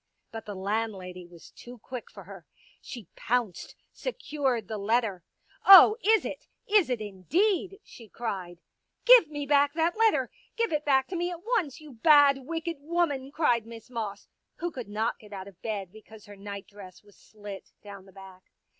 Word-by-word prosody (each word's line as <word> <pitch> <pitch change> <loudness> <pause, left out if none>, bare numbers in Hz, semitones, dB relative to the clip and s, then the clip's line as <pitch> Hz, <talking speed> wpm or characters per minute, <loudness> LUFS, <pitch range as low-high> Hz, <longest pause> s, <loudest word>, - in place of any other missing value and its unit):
But 225 -1 -8
the 205 - -6
landlady 190 -3 -4
was 170 -1 -16
too 245 +1 -12
quick 245 +2 -9
for - - -12
her. - - -13 0.3
She 235 - -9
pounced, 235 -6 -2 0.2
secured 285 - -3
the 215 0 -5
letter. 205 -3 0 0.2
" - - -32
Oh, 390 +2 +10
is 440 +2 +3
it! - - -7 0.2
Is 405 -8 +3
it 250 -2 -1
indeed! 360 - -1
" - - -50
she 230 -3 -13
cried. 185 -7 -6 0.2
*' - - -49
Give - - +8
me 290 -1 -5
back 285 0 +3
that 330 +1 +1
letter. 445 -1 +2 0.3
Give 460 -7 0
it 300 0 -1
back 265 -2 +3
to 370 - -5
me 350 +1 -1
at 350 -1 -8
once, 365 - -1
you 305 -2 -13
bad, 280 +2 +5
wicked 330 0 -4
woman," 290 -4 -1
cried 240 -8 +1
Miss 230 +1 -12
Moss, 215 -4 -5 0.3
who 345 0 -4
could 250 -8 -8
not 220 +3 -2
get 210 -1 -14
out 190 -1 -7
of 190 -3 -16
bed 200 -5 -4
because 220 0 -15
her 205 - -12
night 200 0 -8
dress 195 -2 -13
was 205 -1 -21
slit 205 -2 -11
down 200 -2 -11
the - - -16
back. 190 -1 -15
235 Hz, 190 wpm, -27 LUFS, 205-310 Hz, 0.3 s, Oh